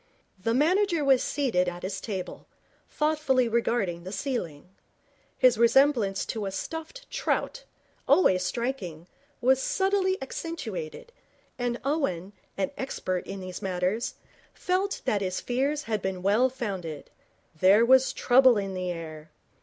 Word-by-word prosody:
The 230 +4 0
manager 335 +2 +2
was 265 -2 +5
seated 230 -11 0
at 175 0 -9
his 190 +1 -4
table, 190 -5 -6 0.4
thoughtfully 300 -5 +1
regarding 225 -7 0
the 185 - -7
ceiling. 180 - -4 0.7
His 250 -4 +4
resemblance 235 -5 +3
to 215 -3 -3
a - - -3
stuffed 325 - -6
trout, - - -2 0.4
always 185 - +4
striking, 185 -6 -3 0.4
was 260 +2 +4
subtly 385 +1 +1
accentuated, 260 - -6 0.5
and 245 -1 -1
Owen, 205 - -1 0.2
an 195 -1 -1
expert 185 -9 -3
in 195 0 -6
these 185 -1 -7
matters, 190 +5 -1 0.4
felt 380 +2 -1
that 215 -6 +1
his 185 -1 -2
fears 275 +5 -1
had 215 -6 -2
been 185 -1 -3
well 215 +7 +3
founded 190 - -5 0.5
there 200 +6 +6
was 260 +1 +5
trouble 255 -1 +5
in 195 -1 -2
the 185 -1 -3
air. 160 -2 -8
235 Hz, 130 wpm, -27 LUFS, 185-275 Hz, 0.7 s, there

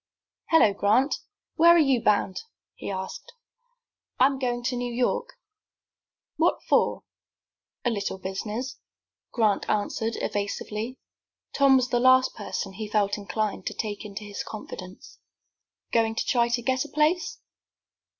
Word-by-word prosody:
"Hello, 270 -11 +5
Grant! 215 +8 +3 0.4
Where 340 +2 +7
are - - +6
you 270 -7 +3
bound?" 200 -3 +1 0.3
he - - -7
asked. 200 - -6 0.9
"I 255 - +7
am 270 0 +1
going 245 -2 -1
to 250 +1 -1
New 245 0 -3
York." 475 - -1 1.0
"What - - +2
for?" - - +2 0.8
"A 240 - +3
little 200 -3 -2
business," 210 +7 -5 0.5
Grant 215 -4 +1
answered, 220 +2 -1
evasively. 210 +4 -3 0.6
Tom 275 -1 +5
was 255 -1 +2
the 240 - +2
last 255 +1 +5
person 195 -1 -5
he 215 +3 -5
felt 205 -1 +1
inclined 210 -1 -3
to - - -3
take 210 -2 -4
into 210 0 -7
his 205 -1 -5
confidence. 185 -3 -9 0.7
"Goin' 225 -1 +2
to - - -1
try 235 -1 +2
to 240 0 -1
get 260 +1 +1
a 300 - -10
place?" 325 - +1
235 Hz, 140 wpm, -26 LUFS, 205-260 Hz, 1.0 s, Where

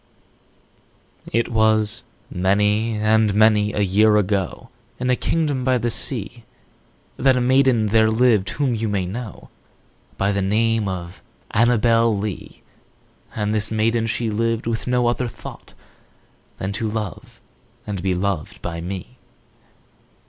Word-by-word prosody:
5 - - -10
It 115 - +1
was 110 -2 +2 0.3
many 105 +4 +1
and 110 -1 +2
many 105 -1 +4
a 105 - -1
year 105 +2 +4
ago, 100 -3 -1 0.3
In 125 0 0
a - - +3
kingdom 145 -2 -1
by 130 0 +2
the 120 0 -1
sea, 115 -2 -4 0.7
That 130 -1 +3
a - - +2
maiden 130 -2 +3
there 110 +1 +3
lived 110 -3 +3
whom 135 -3 -1
you 110 -1 -2
may 100 -3 -1
know 110 +4 -7 0.7
By 100 +1 +1
the 100 0 -1
name 110 +2 +1
of 90 -2 -6 0.3
ANNABEL 115 -1 +3
LEE; 100 -1 -6 0.7
And 105 -1 -1
this 105 -1 0
maiden 115 +1 +1
she 115 0 -2
lived 115 +1 -1
with 115 +1 -3
no 125 -1 +2
other 120 +1 0
thought 115 0 -11 0.8
Than 95 - -3
to 110 +2 -2
love 105 -5 -6 0.5
and 100 -4 -4
be 95 0 0
loved 95 -3 -3
by 85 -1 -4
me. 95 +7 -7
110 Hz, 140 wpm, -21 LUFS, 100-115 Hz, 0.8 s, many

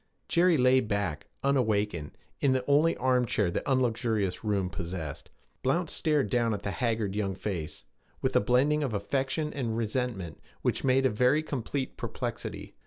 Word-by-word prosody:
Jerry 175 -1 +4
lay 130 0 +5
back, 100 - -2 0.2
unawakened, 105 - 0 0.2
in 135 -2 +3
the 130 -1 0
only 150 +4 +3
armchair 125 -7 +2
the - - -1
unluxurious 115 -7 +1
room 100 -4 0
possessed. 85 -3 -5 0.3
Blount 165 +6 0
stared 150 -4 +1
down 120 -3 +1
at - - -8
the 100 - -2
haggard 110 0 -1
young 100 -3 -1
face, 90 -6 -5 0.3
with - - -1
a - - +7
blending 135 +7 +3
of 130 -7 -1
affection 135 +8 -1
and 115 -5 -2
resentment 110 - -2 0.2
which - - 0
made 135 0 +3
a - - +5
very 125 +8 +3
complete 135 -2 -3
perplexity. - - -5
120 Hz, 155 wpm, -29 LUFS, 100-135 Hz, 0.3 s, a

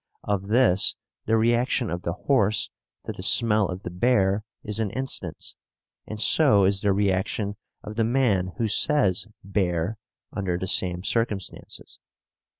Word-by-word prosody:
Of 100 -1 -2
this 110 -4 +3 0.3
the 115 +1 +3
reaction 120 +1 +1
of 85 0 -4
the 85 - -3
horse 110 -1 +1 0.3
to - - -4
the - - -9
smell 110 -4 +4
of 90 +1 -7
the - - -6
bear 100 0 +1 0.2
is 105 0 -1
an 110 -2 -1
instance, 110 -9 -5 0.5
and 110 - -7
so 110 -5 +4
is 100 0 +2
the 100 - +2
reaction 100 +1 -1 0.3
of 105 +1 -9
the 115 - +2
man 110 -7 +1
who 115 -2 0
says 105 -4 +2 0.2
"bear" 95 0 -2 0.3
under 95 -4 -2
the 95 - -4
same 90 -1 +1
circumstances. 105 -3 -3
105 Hz, 150 wpm, -24 LUFS, 95-115 Hz, 0.5 s, smell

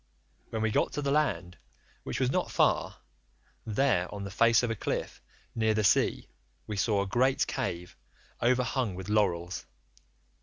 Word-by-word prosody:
When 110 -1 -3
we 110 - +1
got - - +1
to 145 - -3
the 140 - 0
land, 130 -12 0 0.4
which - - -4
was 130 -1 +1
not - - 0
far, - - +1 0.7
there, 105 -6 +1
on 100 -1 -6
the 100 - -6
face 115 +3 +4
of 120 - 0
a - - -1
cliff - - -4 0.3
near 110 -1 +1
the 110 - +1
sea, 100 - +2 0.4
we 105 - -5
saw 100 0 +1
a - - -5
great 130 +6 +2
cave 90 -9 -4 0.5
overhung 125 -3 +1
with 95 +1 -7
laurels. 90 -4 0
110 Hz, 160 wpm, -29 LUFS, 100-125 Hz, 0.7 s, face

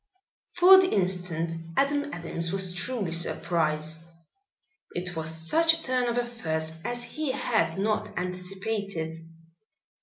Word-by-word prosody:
For 370 +2 +9
the 370 - +1
instant 180 - -1 0.2
Adam 285 +1 +1
Adams 165 -2 -4
was 190 -2 0
truly 195 0 0
surprised. 160 -1 0 0.8
It 180 0 -3
was 160 0 -1
such 305 - +3
a 325 - -4
turn 255 -2 +1
of 235 - -1
affairs 160 -10 -2
as 240 0 -2
he 300 +1 -3
had 165 - 0
not 210 +2 -1
anticipated. 180 -2 -3
180 Hz, 120 wpm, -27 LUFS, 165-245 Hz, 0.8 s, For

